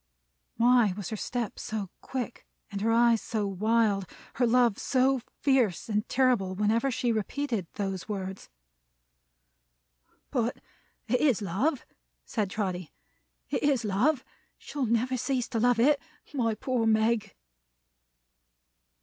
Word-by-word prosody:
Why 235 Hz, -5 st, +4 dB
was 205 Hz, -, -4 dB
her -, -, -1 dB
step 235 Hz, +1 st, -3 dB
so 210 Hz, -4 st, -4 dB
quick, 250 Hz, -2 st, -5 dB, 0.2 s
her 205 Hz, +3 st, 0 dB
eyes 235 Hz, -1 st, +4 dB
so 215 Hz, -2 st, -2 dB
wild, 205 Hz, 0 st, +1 dB, 0.3 s
her 245 Hz, -1 st, +3 dB
love 240 Hz, -3 st, +3 dB
so 265 Hz, 0 st, +2 dB, 0.2 s
fierce 250 Hz, -, +2 dB
and 210 Hz, +1 st, -1 dB
terrible, 245 Hz, -8 st, +2 dB
whenever 220 Hz, +6 st, +2 dB
she 245 Hz, -1 st, 0 dB
repeated 225 Hz, -2 st, -2 dB
those 195 Hz, -1 st, -3 dB
words? 190 Hz, -2 st, -5 dB, 1.8 s
"But, 240 Hz, -3 st, 0 dB, 0.5 s
it 250 Hz, +2 st, +1 dB
is 270 Hz, -8 st, +3 dB
Love," 235 Hz, -, 0 dB, 0.4 s
said 210 Hz, -5 st, -1 dB
Trotty. 185 Hz, -5 st, -3 dB, 0.6 s
"It -, -, 0 dB
is 275 Hz, -6 st, +2 dB
Love. 250 Hz, +8 st, +1 dB, 0.3 s
She'll 275 Hz, -4 st, -3 dB
never 240 Hz, +3 st, +1 dB
cease 250 Hz, -1 st, -1 dB
to 230 Hz, -, -1 dB
love 245 Hz, 0 st, +3 dB
it. 285 Hz, +4 st, +4 dB, 0.3 s
My 230 Hz, -5 st, +1 dB
poor 245 Hz, -1 st, 0 dB
Meg!" 220 Hz, 0 st, +2 dB
230 Hz, 125 wpm, -28 LUFS, 205-250 Hz, 1.8 s, Why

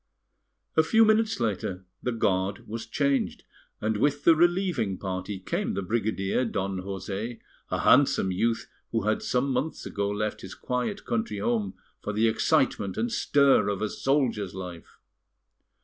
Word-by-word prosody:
A 160 Hz, -, +6 dB
few 225 Hz, +8 st, +5 dB
minutes 220 Hz, -2 st, +2 dB
later 95 Hz, -4 st, -2 dB, 0.2 s
the 125 Hz, -, -1 dB
guard 100 Hz, -3 st, 0 dB
was 115 Hz, +1 st, -5 dB
changed, 140 Hz, +3 st, 0 dB, 0.4 s
and 110 Hz, 0 st, 0 dB
with 145 Hz, +5 st, +1 dB
the 165 Hz, -, +7 dB
relieving 175 Hz, -, +1 dB
party 95 Hz, +1 st, -4 dB
came 95 Hz, -, -2 dB
the 100 Hz, -, -2 dB
brigadier, 110 Hz, +1 st, 0 dB
Don 95 Hz, -5 st, -2 dB
José, 100 Hz, +4 st, -5 dB, 0.3 s
a -, -, -1 dB
handsome 130 Hz, -8 st, +4 dB
youth 115 Hz, +5 st, 0 dB, 0.2 s
who 115 Hz, -2 st, 0 dB
had 110 Hz, +1 st, +1 dB
some 130 Hz, +2 st, 0 dB
months 135 Hz, +6 st, -2 dB
ago 100 Hz, 0 st, -2 dB
left 105 Hz, +1 st, -2 dB
his 95 Hz, -, -8 dB
quiet 125 Hz, +12 st, -3 dB
country 235 Hz, -1 st, -1 dB
home 230 Hz, -4 st, -1 dB, 0.3 s
for 105 Hz, -, -3 dB
the 110 Hz, +2 st, +3 dB
excitement 110 Hz, -, +1 dB
and 240 Hz, +1 st, 0 dB
stir 140 Hz, -, +4 dB
of 100 Hz, 0 st, -2 dB
a 110 Hz, -, 0 dB
soldier's 125 Hz, -9 st, 0 dB
life. 90 Hz, -3 st, -8 dB
115 Hz, 150 wpm, -27 LUFS, 100-145 Hz, 0.4 s, the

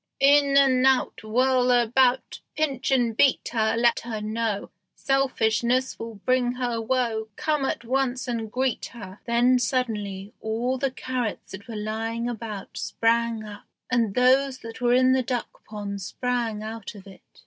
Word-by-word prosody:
"In 280 Hz, 0 st, +5 dB
and 260 Hz, -2 st, +4 dB
out 265 Hz, -4 st, +1 dB
Whirl 250 Hz, +3 st, +2 dB
about; 245 Hz, +1 st, +2 dB, 0.2 s
Pinch 275 Hz, -5 st, -1 dB
and 245 Hz, -4 st, +2 dB
beat 270 Hz, +3 st, +3 dB
her; 220 Hz, -2 st, +1 dB
Let 235 Hz, 0 st, +3 dB
her 230 Hz, -2 st, -5 dB
know 215 Hz, -1 st, -2 dB, 0.2 s
Selfishness 255 Hz, -2 st, +1 dB
will 230 Hz, -1 st, -6 dB
bring 245 Hz, +4 st, +1 dB
her 245 Hz, -2 st, -2 dB
woe; 225 Hz, -2 st, -1 dB
Come 300 Hz, -3 st, 0 dB
at 240 Hz, -, -3 dB
once 260 Hz, +1 st, -1 dB
and 225 Hz, -3 st, -3 dB
greet 255 Hz, 0 st, -1 dB
her." 200 Hz, -4 st, -10 dB
Then 245 Hz, +1 st, +3 dB
suddenly 210 Hz, -5 st, -2 dB
all 235 Hz, +4 st, -1 dB
the 275 Hz, +1 st, +1 dB
carrots 255 Hz, -3 st, -4 dB
that 195 Hz, +2 st, -9 dB
were 230 Hz, -, -7 dB
lying 225 Hz, +2 st, -3 dB
about 220 Hz, -4 st, -6 dB
sprang 230 Hz, -1 st, 0 dB
up, 210 Hz, -1 st, -10 dB, 0.3 s
and 230 Hz, -5 st, +1 dB
those 260 Hz, +1 st, +3 dB
that 230 Hz, +2 st, -9 dB
were 245 Hz, 0 st, +3 dB
in 255 Hz, 0 st, +4 dB
the 260 Hz, 0 st, +3 dB
duck 245 Hz, -1 st, -4 dB
pond 200 Hz, -2 st, -5 dB
sprang 235 Hz, 0 st, -2 dB
out 220 Hz, 0 st, -7 dB
of 195 Hz, -2 st, -12 dB
it. 195 Hz, -1 st, -14 dB
240 Hz, 160 wpm, -25 LUFS, 220-255 Hz, 0.3 s, In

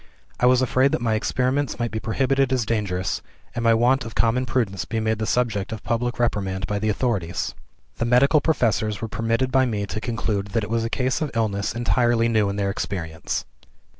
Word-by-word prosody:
I 125 Hz, -, +4 dB
was 130 Hz, 0 st, +4 dB
afraid 130 Hz, +2 st, +2 dB
that -, -, 0 dB
my 115 Hz, -2 st, +1 dB
experiments 130 Hz, +5 st, 0 dB
might 120 Hz, -1 st, -2 dB
be 110 Hz, -, -2 dB
prohibited 135 Hz, +3 st, +1 dB
as 125 Hz, -4 st, +1 dB
dangerous, 100 Hz, -4 st, -1 dB, 0.3 s
and 120 Hz, -, -3 dB
my 115 Hz, 0 st, +5 dB
want 125 Hz, +3 st, +3 dB
of 115 Hz, -1 st, -8 dB
common 125 Hz, +3 st, +2 dB
prudence 110 Hz, -7 st, -1 dB
be 115 Hz, -, -3 dB
made 110 Hz, 0 st, 0 dB
the 110 Hz, -, -2 dB
subject 110 Hz, -6 st, 0 dB
of 110 Hz, -, -6 dB
public 120 Hz, +1 st, -1 dB
reprimand 95 Hz, -6 st, -1 dB
by 105 Hz, +2 st, -2 dB
the 110 Hz, +1 st, 0 dB
authorities. 100 Hz, -7 st, -1 dB, 0.4 s
The -, -, 0 dB
medical 140 Hz, +5 st, +4 dB
professors 110 Hz, -, +1 dB
were 115 Hz, -, -3 dB
permitted 115 Hz, +4 st, -1 dB
by 130 Hz, 0 st, +3 dB
me 105 Hz, -3 st, -2 dB
to 110 Hz, +2 st, -5 dB
conclude 110 Hz, -4 st, -2 dB
that 115 Hz, -2 st, +1 dB
it 105 Hz, -, -5 dB
was 115 Hz, 0 st, +1 dB
a 115 Hz, -, -2 dB
case 130 Hz, +6 st, 0 dB
of 155 Hz, -, 0 dB
illness 100 Hz, -3 st, -1 dB
entirely 120 Hz, -1 st, +2 dB
new 110 Hz, -3 st, +2 dB
in 100 Hz, -, -3 dB
their 100 Hz, -1 st, 0 dB
experience. 80 Hz, -5 st, -4 dB
115 Hz, 205 wpm, -23 LUFS, 105-125 Hz, 0.4 s, my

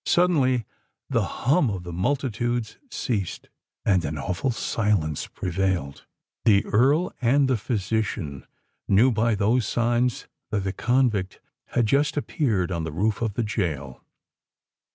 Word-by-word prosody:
Suddenly 135 Hz, -, +3 dB, 0.5 s
the -, -, +3 dB, 0.2 s
hum 140 Hz, 0 st, +4 dB
of 95 Hz, -4 st, -4 dB
the 90 Hz, -1 st, -7 dB
multitudes 120 Hz, +2 st, -1 dB
ceased; 105 Hz, -, -3 dB, 0.4 s
and 95 Hz, -4 st, +3 dB
an 75 Hz, +1 st, -3 dB
awful 90 Hz, -, -2 dB
silence 105 Hz, -, 0 dB
prevailed. 90 Hz, -6 st, -2 dB, 0.4 s
The 100 Hz, -3 st, +4 dB
Earl 140 Hz, -, +2 dB
and 135 Hz, +3 st, +4 dB
the 130 Hz, -, +2 dB
physician 105 Hz, -, -2 dB, 0.4 s
knew 115 Hz, +7 st, +5 dB
by 115 Hz, 0 st, +2 dB
those 110 Hz, +3 st, +2 dB
signs 120 Hz, 0 st, 0 dB, 0.2 s
that 105 Hz, -2 st, -1 dB
the 95 Hz, -1 st, -2 dB
convict 120 Hz, -7 st, +1 dB, 0.3 s
had 120 Hz, -2 st, 0 dB
just 140 Hz, +6 st, +2 dB
appeared 110 Hz, -, 0 dB
on 85 Hz, -2 st, -2 dB
the 80 Hz, -, -4 dB
roof 100 Hz, +8 st, 0 dB
of 110 Hz, -4 st, -1 dB
the 120 Hz, -, 0 dB
gaol. 80 Hz, -, -3 dB
110 Hz, 135 wpm, -25 LUFS, 95-125 Hz, 0.5 s, knew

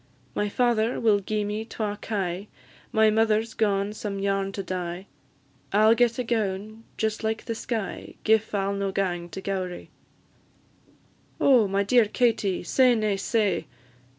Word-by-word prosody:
My 205 Hz, +7 st, -1 dB
father 235 Hz, 0 st, +1 dB
will 215 Hz, -3 st, +3 dB
gi'e 210 Hz, +2 st, -2 dB
me 210 Hz, +2 st, -3 dB
twa 215 Hz, -2 st, -3 dB
kye; 195 Hz, -2 st, -3 dB, 0.4 s
My 220 Hz, -1 st, +4 dB
mother 220 Hz, 0 st, +3 dB
's 225 Hz, -, -11 dB
gaun 200 Hz, -1 st, 0 dB
some 210 Hz, -2 st, -4 dB
yarn 195 Hz, 0 st, 0 dB
to 195 Hz, -, -4 dB
dye; 180 Hz, 0 st, -4 dB, 0.7 s
I 210 Hz, +2 st, +4 dB
'll 220 Hz, -, +7 dB
get 235 Hz, 0 st, +2 dB
a 250 Hz, -, -1 dB
gown 215 Hz, -1 st, -2 dB
just 220 Hz, 0 st, -1 dB
like 220 Hz, 0 st, -2 dB
the 230 Hz, -, -2 dB
sky, 225 Hz, -2 st, -4 dB
Gif 220 Hz, -1 st, +2 dB
I 195 Hz, -1 st, +1 dB
'll 200 Hz, -, -1 dB
no 200 Hz, -1 st, -2 dB
gang 175 Hz, -3 st, -2 dB
to 180 Hz, +4 st, -7 dB
Gowrie." 185 Hz, -2 st, -4 dB, 1.5 s
"Oh, 250 Hz, -6 st, +5 dB
my 195 Hz, +1 st, +1 dB
dear 235 Hz, +3 st, +4 dB
Katie, 210 Hz, -5 st, +1 dB
say 250 Hz, +6 st, +4 dB
nae 215 Hz, -2 st, +1 dB
sae! 200 Hz, +1 st, 0 dB
210 Hz, 160 wpm, -26 LUFS, 195-225 Hz, 1.5 s, ll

